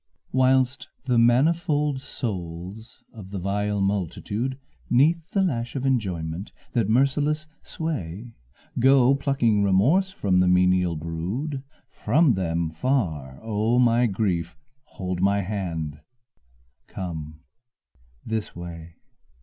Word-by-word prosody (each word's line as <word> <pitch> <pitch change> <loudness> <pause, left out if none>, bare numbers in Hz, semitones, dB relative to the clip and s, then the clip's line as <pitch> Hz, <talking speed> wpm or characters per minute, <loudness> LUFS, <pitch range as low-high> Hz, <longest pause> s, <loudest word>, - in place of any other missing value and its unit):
Whilst 130 0 +2
the 125 -3 +2
manifold 145 +3 +2
souls 100 -2 -6
of 105 -5 -10
the 100 - -5
vile 100 +2 -1
multitude, 100 +6 -2 0.3
'Neath 160 +7 +3
the 195 - +1
lash 120 -9 -2
of 135 -1 -2
enjoyment, 95 -8 -1 0.2
that 115 -4 +1
merciless 145 +5 +2 0.2
sway, 115 - -5 0.5
Go 130 +1 +6
plucking 135 -7 +1
remorse 120 - +3
from 100 - +1
the 90 - +4
menial 90 -1 +3
brood, 90 - -4 0.3
From 140 +5 +2
them 85 -4 -1
far, 80 - -1
O 110 +2 +1
my 120 0 +4
grief, 95 -5 -1 0.3
hold 90 -1 -4
my 100 +1 +3
hand, 85 -7 -4 0.9
come 80 -4 -6 0.8
this 110 -1 -3
way. 85 -1 -8
105 Hz, 110 wpm, -25 LUFS, 90-130 Hz, 0.9 s, Go